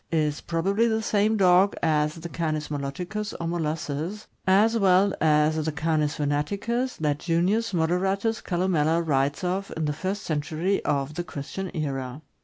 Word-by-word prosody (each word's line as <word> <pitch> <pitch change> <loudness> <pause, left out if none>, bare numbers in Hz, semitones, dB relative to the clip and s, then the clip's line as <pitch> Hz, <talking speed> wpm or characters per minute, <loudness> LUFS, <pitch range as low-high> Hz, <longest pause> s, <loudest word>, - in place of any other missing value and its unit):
is 150 -3 0
probably 195 +7 +1
the 220 -1 0
same 215 +1 +2
dog 190 +1 +5
as 150 -1 +2
the 165 0 -7
Canis 155 -2 -2
moloticus, 175 +9 -4
or 170 - -3
molossus, 165 +3 -3 0.2
as 210 +5 +4
well 195 -2 +4
as 155 0 +3
the 155 - -1
Canis 155 -1 0
venaticus 200 - -1
that 150 -2 0
Junius 185 +7 +1
Moderatus 190 +6 0
Calnmella 170 -3 +1
writes 140 +2 +1
of 190 +2 -2
in 160 - -1
the 150 - 0
first 190 +6 -3
century 160 +5 -1
of 140 0 0
the 175 +3 -3
Christian 175 +4 -6
era. 135 -1 -3
165 Hz, 150 wpm, -26 LUFS, 150-195 Hz, 0.2 s, dog